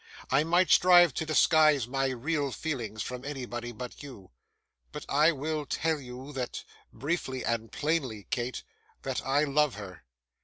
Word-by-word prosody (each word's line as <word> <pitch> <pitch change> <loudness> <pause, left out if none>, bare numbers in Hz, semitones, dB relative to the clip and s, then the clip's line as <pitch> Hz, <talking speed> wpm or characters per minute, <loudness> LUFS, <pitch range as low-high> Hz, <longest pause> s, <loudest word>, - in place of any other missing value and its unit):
I 135 +3 +4
might 175 +1 +2
strive 175 -4 +7
to 160 - -3
disguise 155 -4 +4
my 135 +1 0
real 140 +3 -1
feelings 120 -9 -4
from 125 0 -6
anybody 120 -4 -5
but 125 +1 -8
you; 125 -10 -11 0.6
but - - -7
I 150 +4 +4
will 155 +1 -3
tell 160 -1 0
you 130 +2 -9
that 125 -3 -4 0.3
briefly 140 -4 -3
and 115 -1 -2
plainly, 135 -9 -2
Kate 125 0 -2 0.4
that - - -3
I 140 +3 +2
love 150 -2 +2
her. 95 -5 -10
135 Hz, 150 wpm, -29 LUFS, 125-155 Hz, 0.6 s, strive